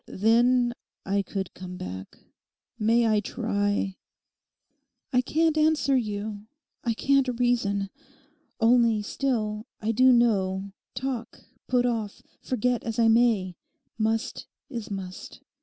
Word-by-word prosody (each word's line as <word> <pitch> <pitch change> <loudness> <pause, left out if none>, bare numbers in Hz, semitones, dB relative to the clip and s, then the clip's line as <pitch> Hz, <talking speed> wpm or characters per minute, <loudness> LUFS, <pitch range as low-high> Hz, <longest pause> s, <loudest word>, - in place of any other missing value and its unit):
Then 240 +3 +3 0.3
I 200 +1 +1
could 195 -1 -5
come 180 0 -8
back. 95 - -7 0.6
May 230 +2 +3
I 215 -1 +3
try?' 205 -3 -1 1.2
'I 250 - +5
can't 315 +4 +1
answer 305 -3 +3
you. 210 -3 -3 0.4
I 230 -1 0
can't 265 -1 +2
reason. 200 -5 +1 0.7
Only, 230 -2 +4
still, 220 -3 -2
I 220 +1 0
do 255 +3 +5
know, 200 -5 +2 0.2
talk, 250 -3 -4 0.2
put 245 -1 +2
off, 225 -4 -2 0.2
forget 250 -1 0
as 225 -1 -4
I 230 -1 +4
may, 220 -6 +3 0.4
must 225 +3 -1 0.2
is 230 -5 -5
must. 190 -2 -7
225 Hz, 115 wpm, -26 LUFS, 205-245 Hz, 1.2 s, I